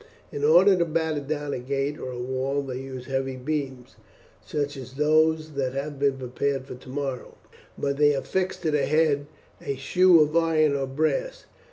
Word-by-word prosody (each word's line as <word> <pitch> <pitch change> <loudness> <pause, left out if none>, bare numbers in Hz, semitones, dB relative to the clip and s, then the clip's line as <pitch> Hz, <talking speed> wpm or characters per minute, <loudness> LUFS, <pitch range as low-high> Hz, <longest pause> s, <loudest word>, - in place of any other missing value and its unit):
In 435 -1 -5
order 445 - +6
to 170 - +2
batter 160 -1 -1
down 145 0 -3
a - - -3
gate 140 +3 -2
or 130 - -5
a 125 - -6
wall 130 +3 -2
they 130 -2 -5
use 130 -1 -7
heavy 135 -1 -2
beams, 135 -2 -4 0.5
such 145 -1 -3
as 130 -1 -9
those 155 +2 +2
that 135 -3 -2
have 140 +1 -4
been 140 -1 +2
prepared 130 +1 -2
for - - -8
tomorrow, 130 +1 -6 0.4
but 140 0 -1
they 145 0 +5
affix 185 +7 -2
to 160 -3 0
the 150 -1 +1
head 150 -2 +2 0.4
a 140 - -2
shoe 180 +6 +4
of 150 +1 +1
iron 160 -3 +3
or 135 -1 -1
brass. - - -1
140 Hz, 180 wpm, -25 LUFS, 135-155 Hz, 0.5 s, order